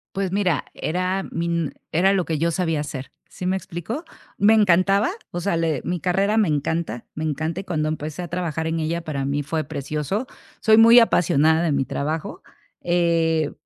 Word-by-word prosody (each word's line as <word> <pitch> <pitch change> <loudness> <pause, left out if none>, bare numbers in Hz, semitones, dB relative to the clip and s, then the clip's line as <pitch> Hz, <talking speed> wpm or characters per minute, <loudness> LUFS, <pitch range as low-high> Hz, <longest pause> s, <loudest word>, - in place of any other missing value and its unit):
Pues, 195 -2 -1
mira, 185 -7 0
era 185 +3 -1
mi 170 +1 -2
n 170 -3 -1 0.2
era 190 +4 +3
lo 185 -3 +1
que 160 -2 -1
yo 165 +2 +1
sabía 165 -3 -1
hacer, 140 -3 -6 0.2
¿sí 180 - -6
me 190 +1 +1
explicó? 190 - -5 0.3
Me 205 +2 +5
encantaba, 200 0 +4 0.2
o 175 - -4
sea, 175 -1 0
le 160 -5 0
mi 175 -1 -2
carrera 195 +5 +1
me 215 -5 +3
encanta, 150 -4 -2
me 155 - -4
encanta. 160 +3 -2
Y 195 - -8
cuando 155 -4 -1
empecé 155 +1 -4
a 175 - -6
trabajar 165 -3 -3
en 160 0 -1
ella, 160 +2 -1
para 140 -4 -3
mí 145 +1 -1
fue 155 +2 -2
precioso. 150 - -3 0.3
Soy 220 -1 +5
muy 230 +2 +8
apasionada 160 -6 +3
de 165 - +1
mi 135 -2 0
trabajo, 155 +4 -4 0.4
eh, 165 -3 +1
165 Hz, 190 wpm, -22 LUFS, 155-185 Hz, 0.4 s, muy